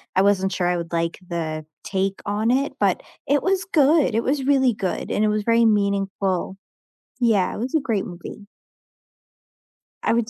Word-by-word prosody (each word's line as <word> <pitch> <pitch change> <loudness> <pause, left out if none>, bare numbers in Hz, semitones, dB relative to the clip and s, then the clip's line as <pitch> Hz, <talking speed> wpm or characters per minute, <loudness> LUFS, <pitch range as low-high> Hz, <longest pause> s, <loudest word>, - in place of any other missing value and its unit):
I 190 - +5
wasn't 195 -1 +2
sure 180 -3 0
I 175 0 +1
would 170 -1 -6
like 165 0 -1
the 155 -2 -4 0.2
take 195 0 -2
on 210 +3 0
it, 275 +3 +1
but - - +2 0.3
it 285 0 +3
was 380 0 0
good, 300 - +3
it 230 - +1
was 270 0 0
really 265 -3 +3
good, 195 -3 -3
and 210 - +1
it - - +3
was 210 0 0
very 230 +1 +3
meaningful. 195 -3 0 0.6
Yeah, 220 -6 +2
it - - -6
was 250 +4 -3
a 315 - +4
great 225 -8 -1
movie. 180 +3 -9 1.6
I - - +2
would 230 -1 +1
210 Hz, 180 wpm, -22 LUFS, 190-255 Hz, 1.6 s, I